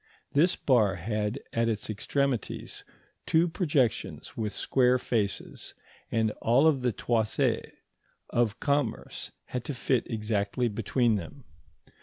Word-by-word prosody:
This 170 +6 +4
bar 110 -8 +3
had 105 +6 -2
at 115 0 +2
its 105 -2 -2
extremities 115 +4 -2 0.4
two 165 +2 +4
projections 150 - 0
with 110 -2 -2
square 125 +1 +3
faces, 110 -5 -3 0.4
and 110 -1 +2
all 135 +8 +5
the 125 -4 0
toises 110 -1 0 0.6
of 120 -3 +1
commerce 140 -5 -1
had 125 -1 -4
to 145 - -4
fit 125 -1 0
exactly 110 +1 0
between 115 +1 +1
them. 100 - -8
120 Hz, 115 wpm, -28 LUFS, 110-135 Hz, 0.6 s, all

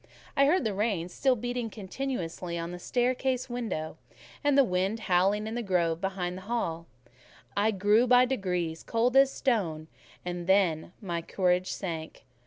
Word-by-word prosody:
I 275 -1 +5
heard 335 +1 +3
the 220 -3 -1
rain 195 -4 -1
still 260 +8 +2
beating 245 0 -3
continuously 190 -5 -4
on 170 +1 -4
the 175 - -7
staircase 255 +3 0
window, 215 -11 -3 0.5
and 290 -1 +3
the 275 - +8
wind 195 +1 -1
howling 195 +3 +2
in 220 - -4
the 240 - -2
grove 170 -5 0
behind 185 -2 -2
the 185 - -8
hall; 170 -8 -2 0.7
I 205 +2 +3
grew 210 +4 +3
by 250 +1 +6
degrees 180 -9 -2
cold 240 +2 0
as 270 0 +6
a - - -11
stone, 165 - -1 0.4
and 175 -1 -4
then 185 -5 +2
my 170 -3 -2
courage 180 +1 +1
sank. 165 -4 -5
195 Hz, 165 wpm, -29 LUFS, 175-245 Hz, 0.7 s, the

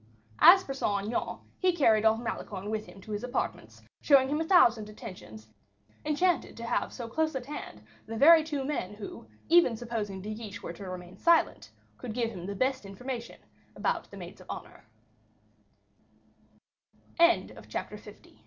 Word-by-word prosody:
As 375 +1 +9
for 270 - -5
Saint 205 -7 -1
Aignan, 230 +3 -2 0.2
he 370 -1 +3
carried 225 -9 +3
off 220 0 +4
Malicorne 205 -3 -5
with 215 -1 -3
him 195 - -13
to 215 - -10
his 210 +1 -3
apartments, 250 +1 -4 0.2
showing 270 -2 +5
him 300 +2 0
a - - -1
thousand 235 - +4
attentions, 145 - -10 0.6
enchanted 330 +4 0
to 230 - -7
have - - -1
so 240 -3 -6
close 315 +5 -1
at 255 -2 -4
hand 245 - -8 0.2
the 225 0 -5
very 315 +5 +8
two 295 -3 -3
men 210 -9 -3
who, 205 - -9 0.2
even 330 -9 +5
supposing 220 -5 -4
De 210 +3 -5
Guiche 210 -2 -8
were - - -5
to 195 -2 -8
remain 180 0 -8
silent, 335 +7 +2 0.3
could 245 -4 -6
give 235 -2 0
him 180 -4 -7
the 200 - -4
best 260 +3 0
information 235 +4 -7 0.4
about - - -1
the - - -11
maids - - -10
of - - -16
honor. - - -8 2.8
Chapter - - -5
L - - -14
230 Hz, 165 wpm, -29 LUFS, 205-280 Hz, 2.8 s, As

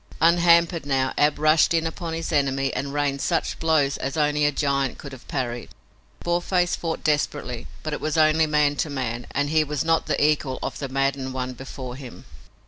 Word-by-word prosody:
Unhampered 170 0 +4
now, 135 -2 0
Ab 150 0 +2
rushed 155 +2 +4
in 165 0 +1
upon 165 0 -4
his 165 0 -4
enemy 135 -1 +1
and 140 +1 -3
rained 140 -1 -1
such 165 - -1
blows 155 -4 +2
as 135 +3 -4
only 150 -1 +2
a 145 - +3
giant 140 -2 0
could 140 - -9
have 130 -2 -12
parried. 120 -3 -3 0.5
Boarface 175 +1 +1
fought 165 -1 -4
desperately, 145 -5 -1 0.2
but 155 - -3
it - - -4
was 155 0 -1
only 155 0 +4
man 150 -1 +2
to 155 - -1
man, 125 -4 -4
and 145 +1 -1
he 155 -1 +4
was 150 -1 -2
not 165 0 +2
the - - 0
equal 150 -3 +1
of - - -4
the 140 - -4
maddened 135 -1 -1
one 130 0 -3
before 130 0 -8
him. 130 -3 -11
145 Hz, 195 wpm, -24 LUFS, 135-160 Hz, 0.5 s, Unhampered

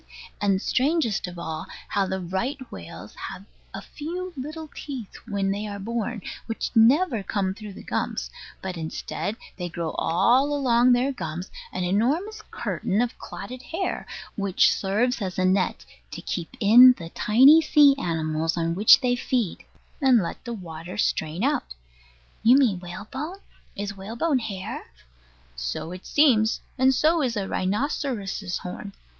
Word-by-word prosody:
And 200 -2 +2
strangest 265 - +1
of 180 0 -8
all, 160 -2 -5 0.2
how 200 -1 +1
the 190 0 -2
right 190 +10 -2
whales 90 +3 -9 0.2
have 195 - -9 0.3
a - - -7
few 360 +4 -6
little 310 +4 -6
teeth 260 -8 -7
when 200 -3 0
they 205 +2 -3
are 200 -1 -5
born, 225 0 -3 0.2
which 225 - -3
never 245 - +5
come 190 -1 -1
through 210 0 -9
the - - -11
gums; - - -3 0.3
but, 185 -2 -4
instead, 165 +6 -4 0.2
they 180 -1 -4
grow 165 -1 -3
all 245 - +3
along 250 -3 +4
their 250 +3 +2
gums, 175 - -5 0.2
an 185 - -3
enormous 290 - 0
curtain 195 - -2
of 245 0 0
clotted 255 0 -8
hair, 355 +7 -3 0.3
which 200 -2 +3
serves 220 +5 0
as 185 -2 -3
a 185 - +2
net 185 0 +1 0.2
to - - -7
keep 165 - -3
in 245 +5 +8
the 165 -1 -8
tiny 265 - +6
sea 295 -2 +6
animals 160 -2 -1
on 165 0 0
which 205 +9 +7
they 250 -2 +2
feed, 245 -5 -1 0.4
and 265 -3 +6
let - - -6
the 235 - -4
water 175 -1 -8
strain 160 -1 0
out. 285 0 0 0.7
You 245 +4 +6
mean 230 -10 +3
whalebone? 215 - -6 0.4
Is 200 0 -4
whalebone 235 +9 -1
hair? 200 -5 -5 0.7
So - - -4
it 180 +1 -9
seems. 235 -7 +4 0.2
And 260 +1 +5
so 315 +5 +3
is 245 -5 0
a 195 -2 -2
rhinoceros's 205 - -2
horn. 195 +2 -7
210 Hz, 150 wpm, -25 LUFS, 185-260 Hz, 0.7 s, in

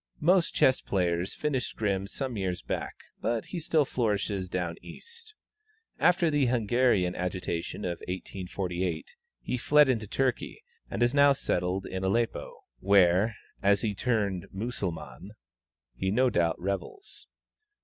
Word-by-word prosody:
Most 175 +2 +3
chess 130 - +4
players 90 -1 -1
finished 135 -4 -2
Grimm 100 -2 -1
some 130 +4 -4
years 95 -3 -2
back, - - -4 0.3
but 115 -2 -1
he 175 - -5
still 155 -2 +2
flourishes 100 -6 -1
"down 90 -2 -2
East." 465 -2 -12 0.6
After 175 -2 +4
the 145 -3 +2
Hungarian 120 -5 +2
agitation 90 +1 -3
of 85 -2 -3
1848, 90 -2 -4 0.3
he 125 - -2
fled 150 +3 +5
into 110 -4 0
Turkey, 130 +3 -1 0.3
and 120 - 0
is 120 +2 +2
now 140 0 +6
settled 90 -6 -1
in 95 0 -4
Aleppo, 115 +5 -1 0.2
where, 100 - +4 0.3
as 100 0 +3
he 105 -2 -1
turned 100 -5 -1
Mussulman, 95 -5 -5 0.6
he 80 +11 -2
no 125 +5 +3
doubt 85 -1 +1
revels. 100 - -5
100 Hz, 130 wpm, -28 LUFS, 90-130 Hz, 0.6 s, now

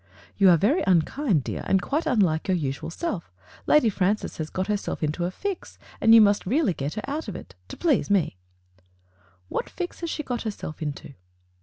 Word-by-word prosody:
"You 195 -2 +5
are 175 - +7
very 245 - +2
unkind, 185 - +2
dear, - - -4
and 190 - +3
quite 285 - -2
unlike 185 -10 +2
your 185 -1 +2
usual 140 -2 -3
self. 175 - -4 0.4
Lady 300 -6 +5
Francis 205 0 0
has 155 -1 -4
got 185 - -2
herself 205 -5 -2
into 155 +3 -1
a - - 0
fix, 385 - -5 0.2
and 225 0 +7
you 225 - +9
must 205 -2 +3
really 265 - +2
get 145 +2 -4
her 215 - -4
out 295 0 -3
of 205 - -5
it - - -10
— 90 - -38
to - - -8
please 315 -11 +1
me." 195 - +2 1.1
"What - - -3
fix 355 -1 -5
has 335 - -4
she 305 - -3
got 245 -4 -3
herself 200 -8 -6
into?" 145 -2 -5
200 Hz, 200 wpm, -25 LUFS, 165-260 Hz, 1.1 s, you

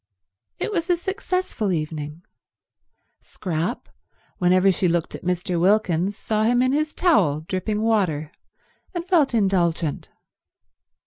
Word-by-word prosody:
It - - -2
was 345 -3 -2
a 355 - +3
successful 365 - -2
evening. 155 0 -4 1.0
Scrap, 180 +5 -4 0.5
whenever 185 +2 +4
she 185 0 +1
looked 170 -1 0
at - - -7
Mr. 180 0 -1
Wilkins, 195 -1 +2
saw 215 -1 -1
him 245 +2 +3
in 255 - +2
his 300 +2 -1
towel, 185 - +3
dripping 205 +6 -2
water, 180 -10 +1 0.6
and 345 -1 -3
felt 315 -9 +3
indulgent. 175 -7 0
195 Hz, 120 wpm, -23 LUFS, 170-245 Hz, 1.0 s, whenever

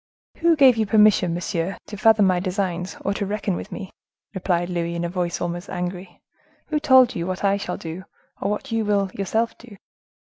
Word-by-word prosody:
"Who 335 0 +3
gave 265 -5 +6
you 220 -1 +1
permission, 210 -5 +4
monsieur, 175 +1 -3
to 210 - -8
fathom 220 0 +4
my 185 -2 +3
designs, 180 -2 -3
or 200 - +1
to 200 - -3
reckon 200 -1 -2
with - - -7
me?" 195 -4 -7 0.4
replied 175 -2 0
Louis, 170 -1 -2
in 170 0 -2
a - - -2
voice 175 -1 -2
almost 175 0 -4
angry; 180 0 -5 0.5
"who 305 -1 +1
told 260 -4 +5
you 170 0 -3
what 185 +1 -4
I 200 0 +3
shall 180 -3 -4
do 170 +3 -7 0.4
or - - 0
what 210 +5 -4
you 225 -1 +1
will 200 -2 +1
yourself 220 +4 -1
do?" 230 -4 -14
195 Hz, 195 wpm, -23 LUFS, 175-215 Hz, 0.5 s, gave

